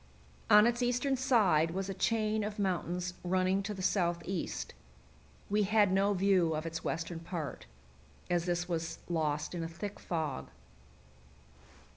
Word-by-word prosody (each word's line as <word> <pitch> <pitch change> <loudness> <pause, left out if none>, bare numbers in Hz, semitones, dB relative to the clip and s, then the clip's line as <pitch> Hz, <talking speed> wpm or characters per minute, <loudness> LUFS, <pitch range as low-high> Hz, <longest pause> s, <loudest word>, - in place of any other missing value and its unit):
On 210 +1 +8
its 240 +1 +1
eastern 245 +3 +1
side 215 - +3
was 195 0 -2
a 195 - -3
chain 215 +2 +1
of 210 +1 -4
mountains 180 -2 -1
running 185 +2 +1
to 205 - -4
the 190 -2 -5
southeast. 180 -1 -1 0.7
We 210 +1 +2
had 205 -1 +3
no 200 +2 +3
view 185 -4 +3
of 155 +1 -3
its 165 0 -4
western 165 +1 -3
part, 165 - -6 0.6
as 175 -1 0
this 175 0 -1
was 165 -2 -3
lost 155 -3 -1
in 170 -2 -3
a - - -3
thick 200 +5 -6
fog. 155 - -3
185 Hz, 145 wpm, -32 LUFS, 170-205 Hz, 0.7 s, On